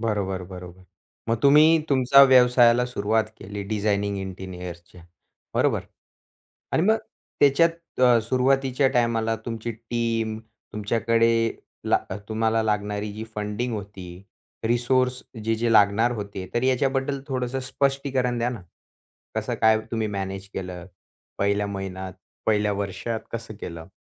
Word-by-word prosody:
बरोबर, 100 -4 -1
बरोबर. 90 0 -10 0.5
मग 115 - +2
तुम्ही 155 +3 +6
तुमच्या 135 0 +6
व्यवसायाला 125 -2 +5
सुरुवात 110 -2 0
केली 100 +1 -6
डिझायनिंग 100 -1 -1
इंटिरियरच्या 90 -2 -8 0.5
बरोबर? - - +2 0.9
आणि 160 - +2
मग 220 +3 +4 0.4
त्याच्यात 145 +4 +5 0.3
अ, 125 -2 +6
सुरुवातीच्या 130 +2 +2
टायमाला 115 -2 +1
तुमची 115 0 -4
टीम 115 -1 -2 0.3
तुमच्याकडे, 115 +2 +2 0.3
ला - - +3
अ, - - -3
...तुम्हाला 110 0 +1
लागणारी 105 -1 -2
जी 110 +1 -6
फंडिंग 105 +3 -3
होती. 95 -3 -8 0.4
रिसोर्स 125 +2 +1 0.2
जे-जे 115 +1 +1
लागणार 105 +3 +4
होते, 100 -4 -6
तर 120 - +1
याच्याबद्दल 135 +1 +1
थोडंसं 130 0 -2
स्पष्टीकरण 135 -3 0
द्या 120 +1 +1
ना! 115 -7 -7 0.7
कसं - - -2
काय 110 0 +5
तुम्ही 110 -2 -1
मॅनेज 95 -1 -5
केलं? 90 -2 -6 0.5
पहिल्या 100 +1 +1
महिन्यात, 95 -1 -5 0.3
पहिल्या 105 -1 +2
वर्षात 100 +3 -3
कसं 115 -1 -6
केलं? 85 -1 -7
110 Hz, 120 wpm, -24 LUFS, 100-125 Hz, 0.9 s, तुम्ही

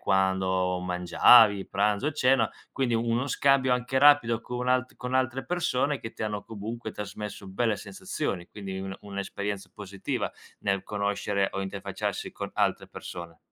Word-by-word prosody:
quando 95 -1 +1
mangiavi, 95 +4 +5
pranzo, 105 +8 +1
cena, 130 -5 +3 0.2
quindi 125 -3 0
uno 115 +3 +1
scambio 135 -2 +3
anche 125 +2 -1
rapido 140 -6 +6
con 125 0 -4
u - - +2
alt 130 0 +1
con 125 +1 -5
altre 130 0 0
persone 145 -5 0
che 115 - -7
ti - - -6
hanno, 105 -1 -3
comunque, 115 +2 -6
trasmesso 105 0 -6
belle 110 +3 0
sensazioni, 155 - -4
quindi, 95 -2 -7
un 95 0 -5
un'esperienza 100 0 -4
positiva 100 -2 -4 0.3
nel 100 -1 0
conoscere 100 -1 0
o 95 - -3
interfacciarsi 95 0 -4
con - - -5
altre - - +1
persone. 85 -1 -8
105 Hz, 145 wpm, -28 LUFS, 95-125 Hz, 0.3 s, rapido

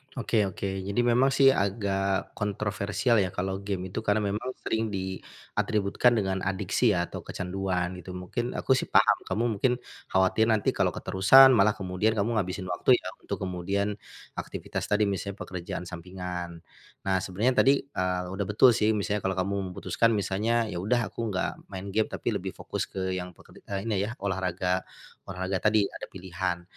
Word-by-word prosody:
Oke 110 -5 +1
oke. 95 - -8 0.2
Jadi 100 +4 +1
memang 120 +2 +4
sih 135 0 +6
agak 100 -3 0
kontroversial 105 +3 0
ya 95 - +2
kalau 95 +2 -3
game 95 -2 -4
itu 110 - -2
karena 105 -1 +1
memang 125 +5 -4
sering 110 0 0
diatributkan 100 +3 -1
dengan 95 -3 0
adiksi 100 +3 +1
ya 85 0 -1
atau - - -5
kecanduan, 90 -1 -2
gitu. 90 +1 -8
Mungkin 105 +7 -4
aku - - -1
sih 130 - +3
paham - - +5
kamu 115 - 0 0.2
mungkin 125 +2 +3 0.3
khawatir 95 +4 +3
nanti 110 -3 +2
kalau - - 0
keterusan 130 +8 +7
malah 105 -3 +4
kemudian 95 +3 0
kamu 110 +2 +1
ngabisin 95 -1 -3
waktu 125 +8 +4
ya, - - -4
untuk - - -5
kemudian 100 +3 -2 0.4
aktivitas - - -5
tadi 105 +1 +2
misalnya 100 0 -2
pekerjaan 90 -1 -5
sampingan. 90 -1 -6 0.4
Nah 95 -1 +1
sebenarnya 105 +8 0
tadi, 135 - +6
eee, 90 -8 -2
udah 95 +1 -2
betul 110 +5 +6
sih 110 -1 +2
misalnya 105 0 -1
kalau 95 -1 -1
kamu 95 +2 -1
memutuskan 115 +5 +1
misalnya, 110 +3 0
ya 85 - -3
udah 115 +3 0
aku 115 -1 -3
enggak 95 -2 -1 0.2
main 100 0 -7
game, 110 +2 +1
tapi - - -3
lebih - - -4
fokus - - -4
ke 95 -1 -3
yang 90 -1 -4
peker - - -17
e - - -10
ini 105 -3 0
ya 115 - -6
olahraga, 95 -1 0 0.5
olahraga 95 0 -2
tadi 105 +1 +3
ada - - -8
pilihan. 90 -1 -4
100 Hz, 170 wpm, -27 LUFS, 95-110 Hz, 0.5 s, keterusan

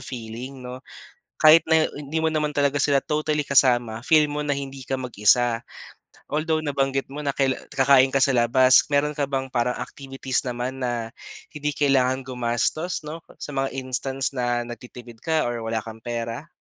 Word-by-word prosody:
feeling, 125 +2 -8
'no? 125 +1 -7 0.6
Kahit 155 +1 +7
na 160 -1 +5
hindi 145 +2 -4
mo 160 - 0
naman 155 -1 0
talaga 145 -1 +1
sila 140 -2 +3
totally 150 0 -1
kasama, 120 -4 +3
feel 155 +2 +4
mo 150 0 -3
na 145 - -3
hindi 135 -1 -6
ka 130 +1 -3
mag-isa. 120 -1 +2 0.7
Although 155 +1 0
nabanggit 135 -2 -1
mo 145 - -6
na 140 -2 -2
kaila 135 -1 +1
kakain 135 0 +4
ka 135 - +5
sa 135 - +3
labas, 130 +1 +5
meron 145 +1 +1
ka 140 -2 -1
bang 135 -1 -3
parang 125 0 0
activities 135 -1 -3
naman 125 +2 -4
na 120 -3 -3 0.4
hindi 150 -1 -3
kailangan 135 -2 +2
gumastos, 125 +8 -1
'no, 155 +2 -7 0.2
sa - - -8
mga 135 -1 -2
instance 130 +1 -2
na 120 -2 -1
nagtitipid 120 -1 -11
ka 160 +4 0
or 120 -1 -2
wala 115 -1 -2
kang 115 0 -10
pera? 115 +6 -5
135 Hz, 170 wpm, -24 LUFS, 120-145 Hz, 0.7 s, Kahit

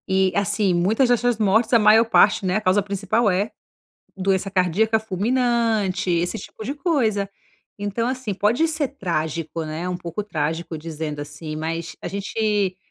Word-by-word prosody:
E, 190 -1 +2
assim, 200 -1 +2
muitas 210 +9 +2
dessas 245 -1 +2
mortes, 220 +2 +2
a 235 - +7
maior 215 +2 +6
parte, 210 -3 +4
né, 185 0 +1
a - - -2
causa 195 0 +3
principal 205 +3 0
é 195 +3 0 0.7
doença 195 +1 0
cardíaca 195 +4 +2
fulminante, 220 -2 0
esse 175 +5 0
tipo 215 - -10
de 270 +6 -3
coisa. 235 - 0 0.5
Então, 205 +3 -2
assim, 255 -4 -3
pode 220 - +2
ser 310 -3 0
trágico, 165 - -3
né, 155 +3 -4
um 180 - -2
pouco 175 +4 -5
trágico, 160 -3 -3
dizendo 155 -1 -5
assim, 150 +2 -7
mas 165 +1 -4
a - - -3
gente 200 -1 -1
200 Hz, 160 wpm, -22 LUFS, 175-220 Hz, 0.7 s, a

